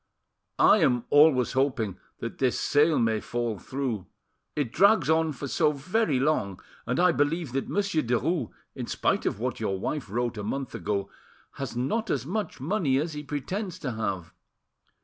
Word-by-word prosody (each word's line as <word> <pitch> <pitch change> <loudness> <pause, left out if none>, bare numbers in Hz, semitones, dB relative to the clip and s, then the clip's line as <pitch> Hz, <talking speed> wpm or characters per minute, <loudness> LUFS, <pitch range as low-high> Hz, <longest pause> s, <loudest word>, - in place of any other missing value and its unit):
"I - - +6
am 125 -2 +2
always 145 -4 +5
hoping 130 -7 0 0.2
that 115 - -5
this 130 -2 +1
sale 150 +2 +3
may 115 -2 +2
fall 120 -2 -3
through; 120 -3 -3 0.5
it 145 -6 -1
drags 190 -4 +4
on 160 0 +2
for 140 0 -6
so 150 +3 +2
very 155 - 0
long; 125 -10 0 0.3
and 125 - 0
I 180 0 +5
believe 155 -1 0
that 135 +1 -2
Monsieur 200 -6 +1
Derues, 125 +3 0 0.2
in - - -6
spite - - 0
of - - -2
what 125 +1 -2
your 95 -4 -1
wife 130 +2 -3
wrote 120 +1 -2
a - - -4
month 135 +5 -3
ago, 100 -2 -2 0.4
has 130 -4 -6
not 145 - -1
as 130 -3 -1
much 205 +3 -3
money 145 -2 +1
as 155 +3 -1
he 150 - -5
pretends 165 +7 -4
to 130 - -4
have. 100 -7 -3
135 Hz, 170 wpm, -27 LUFS, 115-155 Hz, 0.5 s, I